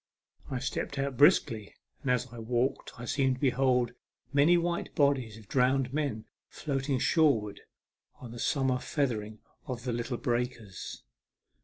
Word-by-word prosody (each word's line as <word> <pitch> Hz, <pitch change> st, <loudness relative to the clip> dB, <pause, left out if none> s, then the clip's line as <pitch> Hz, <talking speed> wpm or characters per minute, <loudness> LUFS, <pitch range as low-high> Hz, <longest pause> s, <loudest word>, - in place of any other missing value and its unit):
I 130 Hz, -, -2 dB
stepped 135 Hz, +2 st, -3 dB
out 135 Hz, -1 st, -1 dB
briskly, 115 Hz, -, +3 dB, 0.3 s
and 135 Hz, -, -3 dB
as 125 Hz, 0 st, +2 dB
I 120 Hz, -, -8 dB
walked 120 Hz, +3 st, -1 dB
I 120 Hz, -, -6 dB
seemed 135 Hz, -1 st, +1 dB
to -, -, -13 dB
behold 125 Hz, -2 st, +2 dB, 0.4 s
many 150 Hz, +5 st, +5 dB
white 170 Hz, 0 st, -2 dB
bodies 130 Hz, -6 st, +2 dB
of 110 Hz, -2 st, -14 dB
drowned 130 Hz, +1 st, +2 dB
men 140 Hz, -8 st, -1 dB, 0.2 s
floating 135 Hz, -2 st, -2 dB
shore 150 Hz, -1 st, +4 dB
wards 105 Hz, -1 st, -8 dB, 0.6 s
on 120 Hz, -3 st, -9 dB
the 120 Hz, -, -8 dB
summer 130 Hz, -2 st, +1 dB
feather 125 Hz, -8 st, 0 dB
ing 110 Hz, +1 st, -11 dB, 0.3 s
of 125 Hz, -2 st, -4 dB
the 125 Hz, -2 st, -2 dB
little 120 Hz, +1 st, -2 dB
breakers. 120 Hz, -4 st, -3 dB
125 Hz, 155 wpm, -30 LUFS, 120-140 Hz, 0.6 s, many